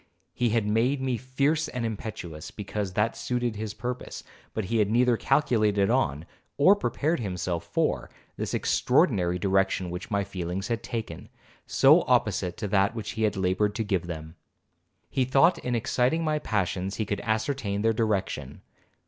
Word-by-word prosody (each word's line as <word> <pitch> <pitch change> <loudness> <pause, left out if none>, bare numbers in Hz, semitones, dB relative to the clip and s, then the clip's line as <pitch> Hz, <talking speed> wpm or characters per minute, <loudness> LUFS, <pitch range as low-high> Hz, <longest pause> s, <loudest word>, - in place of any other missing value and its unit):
He 120 -1 +1
had 110 -1 +1
made 115 +6 +2
me 130 -1 0
fierce 140 +6 0
and 125 -2 -3
impetuous, 100 -8 -6
because 100 -2 -4
that 105 +4 +1
suited 120 -2 -2
his 105 0 -5
purpose, 125 +2 -5 0.3
but 110 - -3
he 115 +5 0
had 105 -1 +2
neither 120 +2 +3
calculated 105 -7 +2
on, 70 +4 0 0.3
or 185 +8 +6
prepared 165 -5 -1
himself 90 -5 -3
for, - - -1 0.3
this - - -3
extraordinary 90 -1 +2
direction 95 -1 +1
which 90 +4 -6
my 100 -2 +1
feelings 95 +1 -4
had 115 -1 -1
taken, 115 -1 -6 0.4
so - - +6
opposite 90 - +1
to 105 - -3
that 100 +2 +2
which 110 -3 -4
he 110 - -5
had 105 -2 +1
laboured 95 +3 +1
to 110 - -1
give 95 -5 -1
them. 80 -1 -7 0.7
He 130 - 0
thought, 135 +7 +4
in 125 -1 -2
exciting 125 +7 +1
my 155 -1 0
passions, 95 -5 -1
he 110 - -2
could 100 0 -3
ascertain 110 -2 -1
their 115 0 +3
direction. 110 -3 -2
110 Hz, 165 wpm, -27 LUFS, 95-125 Hz, 0.7 s, or